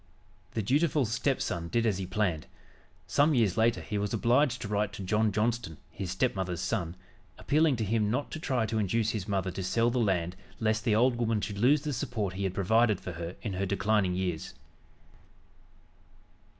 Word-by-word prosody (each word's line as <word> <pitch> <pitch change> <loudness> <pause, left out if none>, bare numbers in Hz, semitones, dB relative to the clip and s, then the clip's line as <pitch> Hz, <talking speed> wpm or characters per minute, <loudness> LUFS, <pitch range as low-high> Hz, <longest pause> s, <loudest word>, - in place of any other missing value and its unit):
The 110 - 0
dutiful 145 - +2
stepson 110 -7 -1
did 115 +6 0
as 100 -4 +1
he 95 - -4
planned. 95 -5 -1 0.6
Some 145 +1 +3
years 110 -7 +2
later 115 +1 +2
he 105 -2 -3
was 105 +2 -1
obliged 125 +3 +2
to - - -4
write 105 0 -1
to 100 - -6
John 105 +3 +2
Johnston, 105 -5 -1
his 95 -3 -5
stepmother's 95 -4 -1
son, 90 -3 -2 0.4
appealing 155 -1 +2
to 115 -2 -2
him 105 0 +1
not 130 +6 -2
to - - -5
try 130 -6 0
to 110 0 -1
induce 110 +2 +1
his 105 -3 -4
mother 95 -2 -1
to 95 - -5
sell 115 +6 +1
the 125 - 0
land 90 -5 0 0.2
lest 110 +1 0
the 110 -4 +3
old 120 +2 +3
woman 115 -2 +1
should 100 -1 -4
lose 140 +6 +4
the 150 -2 -2
support 115 -7 -2
he 100 +1 -3
had 95 -1 -2
provided 110 +1 +3
for 90 - -6
her 85 +1 -6
in 105 - -3
her 95 +2 -1
declining 100 -1 +1
years. 90 -3 -3
110 Hz, 190 wpm, -29 LUFS, 95-120 Hz, 0.6 s, lose